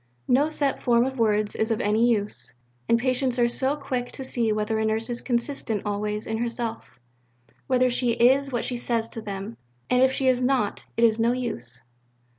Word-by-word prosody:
No 280 Hz, +5 st, +3 dB
set 285 Hz, -3 st, 0 dB
form 240 Hz, -1 st, +3 dB
of 265 Hz, -1 st, -4 dB
words 210 Hz, -2 st, +1 dB
is 220 Hz, -, 0 dB
of 225 Hz, -, 0 dB
any 215 Hz, +3 st, +2 dB
use. 205 Hz, -, -2 dB, 0.3 s
And 230 Hz, -, +5 dB
patients 255 Hz, +1 st, 0 dB
are 240 Hz, -1 st, +4 dB
so 265 Hz, +4 st, +1 dB
quick 260 Hz, -4 st, -4 dB
to 265 Hz, -, -6 dB
see 235 Hz, -4 st, 0 dB
whether 215 Hz, +1 st, -1 dB
a -, -, 0 dB
Nurse 220 Hz, +2 st, -1 dB
is 240 Hz, -, -1 dB
consistent 235 Hz, -4 st, -1 dB
always 210 Hz, +1 st, -2 dB
in 220 Hz, 0 st, -3 dB
herself 230 Hz, -, -4 dB, 0.7 s
whether 255 Hz, -1 st, +3 dB
she 240 Hz, -1 st, +2 dB
is 265 Hz, +4 st, +3 dB
what 240 Hz, -, -2 dB
she 250 Hz, -, -2 dB
says 230 Hz, -2 st, -1 dB
to 225 Hz, -, -7 dB
them. 200 Hz, +2 st, -6 dB, 0.3 s
And 250 Hz, 0 st, +4 dB
if 260 Hz, 0 st, +5 dB
she 265 Hz, 0 st, 0 dB
is 255 Hz, -1 st, +3 dB
not, 250 Hz, -5 st, 0 dB
it 230 Hz, -, +2 dB
is 225 Hz, -1 st, +4 dB
no 230 Hz, +2 st, +3 dB
use. 230 Hz, -, -5 dB
235 Hz, 200 wpm, -25 LUFS, 220-255 Hz, 0.7 s, And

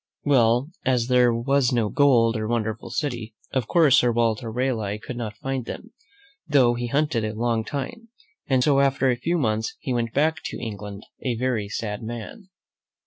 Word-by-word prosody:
Well, 125 Hz, 0 st, +3 dB
as 125 Hz, -2 st, +1 dB
there 125 Hz, -1 st, +5 dB
was 125 Hz, +2 st, +1 dB
no 115 Hz, -4 st, +1 dB
gold 120 Hz, -5 st, +4 dB
or 110 Hz, -1 st, -2 dB
wonderful 110 Hz, -1 st, -2 dB
city, 120 Hz, -7 st, -3 dB, 0.2 s
of 130 Hz, -4 st, -1 dB
course, 155 Hz, -6 st, +5 dB
Sir 120 Hz, -, +2 dB
Walter 115 Hz, -1 st, 0 dB
Raleigh 110 Hz, -4 st, -1 dB
could 115 Hz, +3 st, -8 dB
not 110 Hz, -3 st, -5 dB
find 135 Hz, -2 st, -3 dB
them, -, -, -8 dB, 0.5 s
though 135 Hz, -6 st, +4 dB
he 120 Hz, 0 st, -3 dB
hunted 140 Hz, -2 st, 0 dB
a 110 Hz, 0 st, -3 dB
long 115 Hz, 0 st, 0 dB
time, 150 Hz, -, -6 dB, 0.4 s
and 130 Hz, -2 st, +3 dB
so, 140 Hz, -1 st, +4 dB
after 135 Hz, -1 st, +3 dB
a -, -, +1 dB
few 165 Hz, +8 st, -1 dB
months, 110 Hz, -4 st, -1 dB
he 130 Hz, -, -3 dB
went 115 Hz, -2 st, -1 dB
back 155 Hz, +4 st, +2 dB
to -, -, -5 dB
England 105 Hz, -3 st, -7 dB, 0.2 s
a 125 Hz, -3 st, -1 dB
very 115 Hz, -5 st, -1 dB
sad 105 Hz, -1 st, -4 dB
man. 120 Hz, -, -8 dB
120 Hz, 180 wpm, -24 LUFS, 115-135 Hz, 0.5 s, there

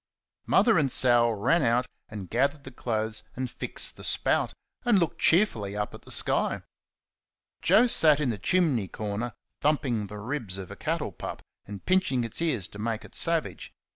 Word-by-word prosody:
Mother 225 Hz, -7 st, +4 dB
and 140 Hz, -4 st, 0 dB
Sal 120 Hz, -2 st, +5 dB
ran 115 Hz, +11 st, +1 dB
out 120 Hz, -1 st, +2 dB, 0.2 s
and 105 Hz, -4 st, -7 dB
gathered 140 Hz, -, 0 dB
the 135 Hz, -, -10 dB
clothes, 110 Hz, -3 st, -2 dB
and 130 Hz, -1 st, -4 dB
fixed -, -, -1 dB
the -, -, -10 dB
spout, -, -, +1 dB, 0.3 s
and 240 Hz, -4 st, +3 dB
looked 170 Hz, -3 st, -1 dB
cheerfully 115 Hz, -, +2 dB
up 105 Hz, -, -3 dB
at -, -, -11 dB
the -, -, -16 dB
sky. -, -, +1 dB, 1.0 s
Joe 235 Hz, -, +5 dB
sat 155 Hz, -11 st, +5 dB
in 140 Hz, -5 st, 0 dB
the 105 Hz, -, -6 dB
chimney 145 Hz, -, +1 dB
corner 105 Hz, +5 st, -4 dB, 0.3 s
thumping 130 Hz, -8 st, 0 dB
the 105 Hz, -, -9 dB
ribs 110 Hz, -3 st, -4 dB
of 95 Hz, -2 st, -8 dB
a -, -, -8 dB
cattle -, -, -3 dB
pup, -, -, -8 dB, 0.2 s
and 100 Hz, -1 st, -9 dB
pinching 185 Hz, -10 st, +1 dB
its 115 Hz, +7 st, -2 dB
ears 130 Hz, -, 0 dB
to 100 Hz, -, -12 dB
make 110 Hz, 0 st, -3 dB
it -, -, -15 dB
savage. 165 Hz, -1 st, -2 dB
120 Hz, 175 wpm, -27 LUFS, 105-155 Hz, 1.0 s, Sal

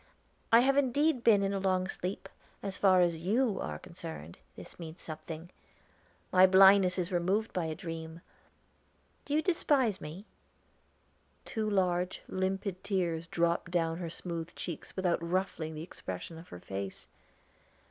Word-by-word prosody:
"I 230 Hz, +1 st, +8 dB
have 275 Hz, +2 st, +3 dB
indeed 285 Hz, 0 st, +2 dB
been 205 Hz, -3 st, +5 dB
in 195 Hz, 0 st, 0 dB
a 195 Hz, -, -1 dB
long 185 Hz, -1 st, +1 dB
sleep, 185 Hz, 0 st, -4 dB, 0.4 s
as 195 Hz, -1 st, -4 dB
far 185 Hz, -3 st, +5 dB
you 190 Hz, +8 st, +1 dB
are -, -, -4 dB
concerned; 165 Hz, -, -9 dB, 0.2 s
this -, -, -11 dB
means 165 Hz, 0 st, -8 dB
something. 160 Hz, +2 st, -7 dB, 0.8 s
My 185 Hz, 0 st, +7 dB
blindness 190 Hz, 0 st, +7 dB
is 180 Hz, 0 st, -2 dB
removed 190 Hz, +5 st, 0 dB
by 180 Hz, -3 st, -1 dB
a 160 Hz, -1 st, -3 dB
dream. 165 Hz, -2 st, -7 dB, 1.0 s
Do 290 Hz, -, -1 dB
you 310 Hz, -, +2 dB
despise 275 Hz, -, +2 dB
me?" 165 Hz, +7 st, -8 dB, 1.2 s
Two 215 Hz, -1 st, -2 dB
large, 180 Hz, -2 st, 0 dB
limpid 190 Hz, 0 st, -2 dB
tears 170 Hz, -5 st, -1 dB
dropped 170 Hz, 0 st, 0 dB
down 165 Hz, -1 st, 0 dB
her 170 Hz, -2 st, -4 dB
smooth 170 Hz, 0 st, -5 dB
cheeks 170 Hz, -, -6 dB
without 180 Hz, -3 st, +1 dB
ruffling 170 Hz, -2 st, -2 dB
the 155 Hz, -, -5 dB
expression 160 Hz, -, -7 dB
of 170 Hz, -, -13 dB
her 90 Hz, -, -9 dB
face. 95 Hz, +1 st, -5 dB
180 Hz, 145 wpm, -31 LUFS, 165-195 Hz, 1.2 s, I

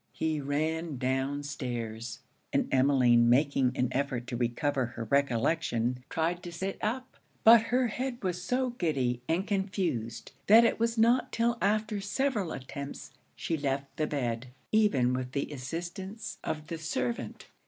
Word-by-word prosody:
He 155 Hz, -2 st, -1 dB
ran 155 Hz, +2 st, -1 dB
down 135 Hz, +3 st, -1 dB
stairs; 120 Hz, -5 st, -5 dB, 0.3 s
and -, -, +1 dB
Emmeline 130 Hz, -3 st, +5 dB
making 135 Hz, 0 st, +3 dB
an 125 Hz, -, +1 dB
effort 130 Hz, -3 st, -1 dB
to 125 Hz, -1 st, -4 dB
recover 125 Hz, +2 st, 0 dB
her 120 Hz, -1 st, -6 dB
recollection, 125 Hz, -1 st, +1 dB
tried 170 Hz, +2 st, -1 dB
to 175 Hz, -, -7 dB
sit 190 Hz, +3 st, -4 dB
up; 255 Hz, +4 st, -3 dB, 0.3 s
but 230 Hz, 0 st, +8 dB
her 250 Hz, 0 st, +2 dB
head 245 Hz, +1 st, -4 dB
was 180 Hz, -1 st, -2 dB
so 250 Hz, +5 st, 0 dB
giddy 135 Hz, -, -1 dB
and 175 Hz, +4 st, +1 dB
confused 185 Hz, -, -2 dB, 0.2 s
that 225 Hz, +3 st, +8 dB
it 230 Hz, -, +1 dB
was 230 Hz, 0 st, +1 dB
not 235 Hz, +3 st, +3 dB
till 235 Hz, +1 st, +1 dB
after 210 Hz, 0 st, +1 dB
several 210 Hz, -, -1 dB
attempts 140 Hz, +2 st, -7 dB, 0.2 s
she 165 Hz, -, -2 dB
left 140 Hz, -2 st, -2 dB
the 155 Hz, -, 0 dB
bed, 120 Hz, -4 st, -2 dB, 0.2 s
even 170 Hz, -, +3 dB
with 125 Hz, 0 st, -3 dB
the 140 Hz, +1 st, -2 dB
assistance 175 Hz, -, -6 dB
of 155 Hz, -1 st, -3 dB
the 165 Hz, 0 st, -5 dB
servant. 180 Hz, +9 st, -3 dB
150 Hz, 150 wpm, -30 LUFS, 130-200 Hz, 0.3 s, but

